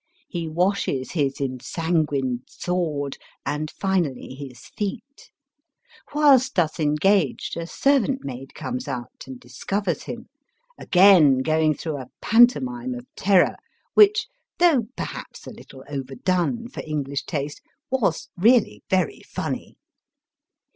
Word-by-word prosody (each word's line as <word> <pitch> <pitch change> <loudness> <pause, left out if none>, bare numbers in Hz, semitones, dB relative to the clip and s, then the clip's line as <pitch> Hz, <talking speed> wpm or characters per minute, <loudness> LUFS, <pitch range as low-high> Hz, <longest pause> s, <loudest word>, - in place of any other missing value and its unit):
He 170 - -4
washes 170 -6 0
his 145 -4 -1
ensanguined 135 -1 -1
sword 155 -6 -3 0.3
and 150 +1 -2
finally 175 -11 -2
his 130 -2 -10
feet. 245 +7 -5 0.8
Whilst 280 -3 +4
thus 165 -4 +1
engaged 155 +2 +1
a 170 0 -4
servant 270 +3 +1
maid 135 0 -8
comes 255 0 -5
out 125 -3 -6
and 260 -1 -8
discovers 200 - -3
him, 240 +1 -8 0.5
again 175 - +5
going 155 0 +2
through 155 +1 -4
a 130 -2 -8
pantomime 245 +2 +3
of 245 0 -8
terror 190 -2 +3 0.4
which, 420 0 +6 0.3
though, 305 -11 +4
perhaps, - - -7
a - - -8
little 130 - -13
overdone 170 - -2
for 245 - -7
EngUsh 140 -3 -3
taste, 145 -2 -4 0.3
was 265 +3 0
really 230 +5 +3
very 185 -4 0
funny. - - -5
175 Hz, 115 wpm, -23 LUFS, 140-235 Hz, 0.8 s, which